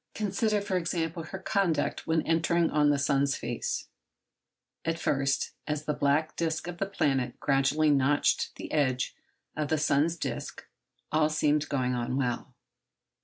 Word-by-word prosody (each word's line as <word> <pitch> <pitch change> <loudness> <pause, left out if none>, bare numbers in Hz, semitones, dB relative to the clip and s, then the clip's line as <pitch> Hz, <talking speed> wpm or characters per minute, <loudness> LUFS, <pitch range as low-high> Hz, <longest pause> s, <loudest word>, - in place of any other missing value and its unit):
Consider, 210 0 0
for 200 -2 -1
example, 165 -1 -2
her 190 - -6
conduct 190 -3 0
when 160 -1 +2
entering 165 +1 +2
on 150 -1 +4
the 145 - +3
sun's 140 0 +2
face:— 120 0 -3 1.0
At 165 0 -1
first, 135 -3 0 0.2
as 150 0 -2
the 150 - 0
black 150 +2 +1
disc 160 0 -2
of 175 -1 -6
the 195 - 0
planet 135 -10 0
gradually 145 +2 +3
notched 140 +1 +2
the - - -8
edge 130 -4 +1 0.4
of 155 -1 -1
the 160 - +1
sun's 155 +3 +2
disc, - - -5 0.5
all 155 0 +3
seemed 150 0 +1
going 130 -3 0
on 125 +1 -1
well. 125 -3 -2
150 Hz, 150 wpm, -29 LUFS, 140-165 Hz, 1.0 s, on